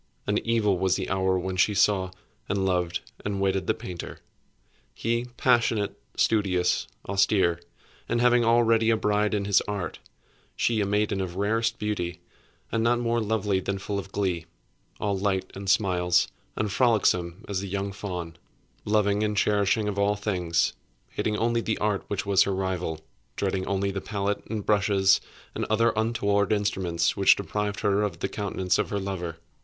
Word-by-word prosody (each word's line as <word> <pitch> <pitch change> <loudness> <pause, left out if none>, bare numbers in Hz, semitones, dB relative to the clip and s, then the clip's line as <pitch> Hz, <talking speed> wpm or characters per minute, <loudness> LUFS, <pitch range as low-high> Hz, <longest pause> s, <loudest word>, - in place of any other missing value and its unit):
And 105 +1 +1
evil 110 -5 +1
was 95 -1 +2
the 95 - -3
hour 95 0 +2
when 95 +1 -3
she 105 +2 +3
saw, 95 -1 +3 0.4
and 95 -1 0
loved, 90 -2 0 0.2
and 100 -1 -2
wedded 95 -1 0
the - - +2
painter. 90 -2 -7 0.8
He, 115 +1 -1
passionate, 115 -4 +2 0.2
studious, 95 -5 +2 0.2
austere, 95 -3 +2 0.5
and 120 - +1
having 120 0 +4
already 115 -1 +4
a 115 - +4
bride 105 0 +1
in 100 -1 -1
his 100 -1 +4
Art; 100 -4 -4 0.6
she 115 -2 +1
a 100 - 0
maiden 105 -1 0
of 90 -2 -4
rarest 115 +4 0
beauty, 90 -5 -3 0.5
and 115 -1 +1
not 120 +1 +3
more 120 -1 0
lovely 105 -3 0
than 100 +1 -3
full 100 +1 -3
of 95 0 -8
glee; 90 -5 -1 0.5
all 100 -2 0
light 95 -1 -1
and 95 0 -5
smiles, 90 -3 +3 0.3
and 105 -2 -1
frolicsome 100 -6 +2
as 100 -2 -2
the 100 - -5
young 100 +1 -2
fawn; 90 -4 -6 0.5
loving 105 -1 +2
and 105 -1 -1
cherishing 105 +1 +2
all 100 0 +1
things; 90 -5 0 0.4
hating 105 -1 -1
only 115 +1 +1
the 110 -1 -1
Art 105 -2 -1
which 100 -1 -3
was 100 -1 +4
her 100 - +2
rival; 90 -4 -2 0.3
dreading 95 -1 -1
only 100 0 0
the 95 0 -4
pallet 100 -1 -2
and 110 -2 -4
brushes 100 -2 +3 0.3
and - - -3
other 115 +2 +2
untoward 100 -3 +1
instruments 95 -5 0
which 100 -1 +6
deprived 105 +2 -3
her 100 -1 +2
of 100 -5 -2
the - - -2
countenance 95 -3 -1
of - - 0
her 100 - -2
lover. 90 -4 -4
100 Hz, 165 wpm, -26 LUFS, 95-105 Hz, 0.8 s, which